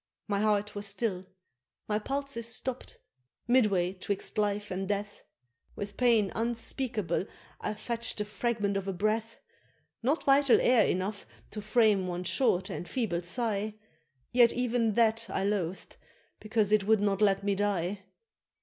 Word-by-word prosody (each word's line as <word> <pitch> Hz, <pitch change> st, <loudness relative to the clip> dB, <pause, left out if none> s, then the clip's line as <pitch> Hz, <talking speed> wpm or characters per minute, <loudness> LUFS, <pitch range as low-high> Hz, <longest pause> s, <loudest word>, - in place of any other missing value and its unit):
My 200 Hz, -2 st, 0 dB
heart 210 Hz, -1 st, +1 dB
was 205 Hz, 0 st, -3 dB
still 200 Hz, -3 st, -2 dB, 0.6 s
my 210 Hz, 0 st, 0 dB
pulses 275 Hz, -1 st, -3 dB
stopp'd 250 Hz, +2 st, -3 dB, 0.5 s
midway 200 Hz, -8 st, +3 dB
'twixt 195 Hz, +1 st, -4 dB
life 205 Hz, 0 st, -1 dB
and 190 Hz, +1 st, -3 dB
death, 205 Hz, 0 st, -3 dB, 0.5 s
With 205 Hz, 0 st, -6 dB
pain 230 Hz, -6 st, +3 dB
unspeakable 230 Hz, -3 st, -1 dB, 0.3 s
I 210 Hz, -, -3 dB
fetch'd 235 Hz, +2 st, -3 dB
the 210 Hz, -, -2 dB
fragment 210 Hz, -1 st, -1 dB
of 195 Hz, 0 st, -4 dB
a 195 Hz, -, -1 dB
breath, 215 Hz, +4 st, -1 dB, 0.7 s
Not 275 Hz, +7 st, +1 dB
vital 275 Hz, -1 st, +5 dB
air 245 Hz, -4 st, +4 dB
enough 195 Hz, +3 st, -2 dB, 0.2 s
to 210 Hz, -, -5 dB
frame 210 Hz, -3 st, +3 dB
one 180 Hz, 0 st, -3 dB
short 190 Hz, -2 st, +1 dB
and 175 Hz, -, -6 dB
feeble 215 Hz, -9 st, -1 dB
sigh, 210 Hz, +2 st, -2 dB, 0.6 s
Yet 240 Hz, -1 st, +5 dB
even 245 Hz, -3 st, +1 dB
that 230 Hz, 0 st, +2 dB
I -, -, -1 dB
loath'd 195 Hz, -3 st, -2 dB, 0.4 s
because 215 Hz, -1 st, 0 dB
it 210 Hz, -2 st, +3 dB
would 220 Hz, -1 st, +5 dB
not 200 Hz, 0 st, 0 dB
let 200 Hz, -1 st, +3 dB
me 200 Hz, 0 st, +1 dB
die. 200 Hz, -1 st, -1 dB
210 Hz, 145 wpm, -30 LUFS, 195-230 Hz, 0.7 s, vital